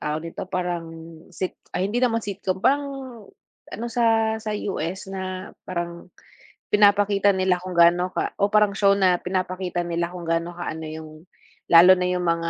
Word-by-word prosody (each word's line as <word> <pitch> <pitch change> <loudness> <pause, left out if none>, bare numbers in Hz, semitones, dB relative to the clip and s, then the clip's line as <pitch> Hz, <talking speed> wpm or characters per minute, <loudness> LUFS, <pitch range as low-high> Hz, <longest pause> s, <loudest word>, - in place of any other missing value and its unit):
tawag 155 +2 -3
dito, - - -6
parang 180 -2 -3 0.5
sit 185 - -4 0.2
ay, 185 +2 -1
hindi 225 - -3
naman 230 -2 +1
sitcom, 195 -2 -4
parang 285 +5 +2 0.9
ano 235 - -4
sa 225 -2 +2
sa 220 -1 -5
US, 190 -2 -4
na 190 0 -5 0.2
parang 175 0 -6 0.6
pinapakita 205 -1 +4
nila 185 -1 +1
kung 185 -1 -6
gaano 175 +2 +5
ka - - -3
o 200 - +3
parang 210 -1 +3
show, 200 0 +3
na 185 -2 +3
pinapakita 180 -1 -2
nila 170 0 -2
kung 175 -1 -8
gaano 165 +1 -2
kaano 160 -2 -5
yung, 155 0 -8 0.6
lalo 175 +2 +9
na 180 -1 0
yung 180 -1 -1
mga 170 0 0
185 Hz, 165 wpm, -23 LUFS, 175-200 Hz, 0.9 s, lalo